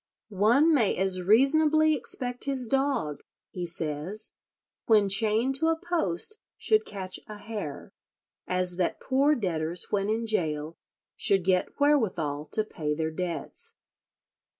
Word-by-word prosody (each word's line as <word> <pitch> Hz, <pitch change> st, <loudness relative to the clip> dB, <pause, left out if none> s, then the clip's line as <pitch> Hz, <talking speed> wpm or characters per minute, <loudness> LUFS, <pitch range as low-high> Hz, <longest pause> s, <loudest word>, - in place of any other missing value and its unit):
One 235 Hz, -, +3 dB
may 230 Hz, -9 st, +2 dB
as 190 Hz, 0 st, 0 dB
reasonably 305 Hz, -, +4 dB
expect 250 Hz, -1 st, -2 dB
his 270 Hz, -3 st, -1 dB
dog," 265 Hz, -, 0 dB, 0.3 s
he 180 Hz, -1 st, -4 dB
says, 165 Hz, +6 st, -1 dB, 0.6 s
"when 215 Hz, -4 st, +5 dB
chained 220 Hz, +5 st, +3 dB
to 320 Hz, -, +1 dB
a 325 Hz, 0 st, +1 dB
post 345 Hz, -, -2 dB, 0.2 s
should 435 Hz, 0 st, +2 dB
catch 190 Hz, -2 st, -5 dB
a 210 Hz, -, -8 dB
hare, 205 Hz, -8 st, -7 dB, 0.6 s
as 180 Hz, -1 st, +2 dB
that 180 Hz, -, -1 dB
poor 275 Hz, +3 st, +2 dB
debtors 175 Hz, -, -3 dB
when 200 Hz, 0 st, 0 dB
in 225 Hz, +1 st, -1 dB
gaol 160 Hz, -7 st, -2 dB, 0.4 s
should 195 Hz, -2 st, +2 dB
get 185 Hz, +7 st, 0 dB
wherewithal 180 Hz, -, +1 dB
to 215 Hz, -, 0 dB
pay 150 Hz, -8 st, -3 dB
their 160 Hz, 0 st, -2 dB
debts." 175 Hz, +1 st, -3 dB
210 Hz, 130 wpm, -27 LUFS, 175-270 Hz, 0.6 s, when